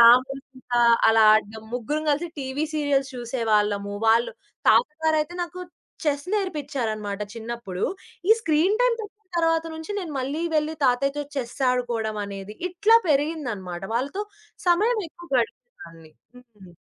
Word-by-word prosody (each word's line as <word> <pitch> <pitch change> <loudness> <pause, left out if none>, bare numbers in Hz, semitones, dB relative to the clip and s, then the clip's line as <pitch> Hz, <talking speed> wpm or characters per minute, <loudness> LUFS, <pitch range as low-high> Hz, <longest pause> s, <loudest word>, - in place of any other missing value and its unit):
రాముడు, 255 +4 +6
సీత 255 -2 -15 0.4
అలా 225 0 +5
ఆడడం. 215 0 -1
ముగ్గురం 295 +6 -2
కలిసి 320 +4 0
టీవీ 275 +3 -2
సీరియల్స్ 280 -3 +1
చూసేవాళ్ళము. 210 -4 0
వాళ్ళు 230 +1 +4 0.4
తాత 230 +5 +6 0.2
గారైతే 315 +1 +1
నాకు 365 +1 -6 0.4
చెస్ 285 0 0
నేర్పిచారన్నమాట. 265 - -2
చిన్నప్పుడు 230 -5 -6 0.5
ఈ - - +5
స్క్రీన్ 350 +4 +2
టైమ - - +4
పెట్టిన 420 0 -9 0.2
తర్వాత 330 -1 +2
నుంచి 320 +4 -8
నేను 340 -6 -5
మళ్ళీ 280 +6 -2
వెళ్లి 310 +1 +1
తాతయ్యతో 275 +3 +2
చెస్ 250 -4 -4
ఆడుకోవడం 235 -4 -1
అనేది 200 +1 -7
ఇట్లా 410 +6 +5
పెరిగిందన్నమాట. 270 - -1
వాళ్ళతో 280 - -1 0.5
సమయం 430 +7 +3
ఎక్కువ 345 +2 -14
గడిపేదాన్ని. 170 - -5 0.5
హ్మ్. 175 -2 -14
265 Hz, 130 wpm, -24 LUFS, 225-315 Hz, 0.5 s, రాముడు